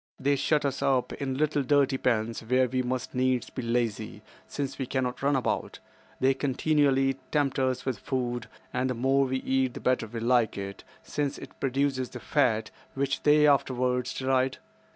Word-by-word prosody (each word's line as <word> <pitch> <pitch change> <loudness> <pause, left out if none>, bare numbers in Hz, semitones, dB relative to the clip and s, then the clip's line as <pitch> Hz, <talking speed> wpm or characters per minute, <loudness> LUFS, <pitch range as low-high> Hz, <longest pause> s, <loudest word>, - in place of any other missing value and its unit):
They 140 +1 +2
shut 145 +1 +1
us 135 -1 -1
up 130 -2 +1
in 135 -2 -3
little 150 0 +1
dirty 140 0 +2
pens 115 -2 0
where 125 +3 +2
we 130 +1 0
must 125 0 -3
needs 130 -1 0
be - - -4
lazy, 115 -3 -2 0.2
since 140 -1 -4
we 130 - -2
cannot 130 -1 -2
run 140 +1 +2
about. 130 - -1 0.4
They 135 +1 +4
continually 135 -1 +2
tempt 145 -3 +1
us 130 -1 0
with 130 -3 -2
food, 120 -4 -3 0.2
and 130 +1 0
the 125 - -1
more 135 +3 +2
we 130 0 -1
eat 130 -1 0
the - - -5
better 125 -3 +1
they 115 +2 -6
like 120 -2 +2
it, 100 0 -6 0.2
since 145 -1 -2
it - - -11
produces 135 -1 0
the - - -8
fat 110 -7 +1 0.2
which 135 0 -1
they 150 0 +5
afterwards 130 -3 +1
deride. 130 0 +1
130 Hz, 175 wpm, -28 LUFS, 125-140 Hz, 0.4 s, they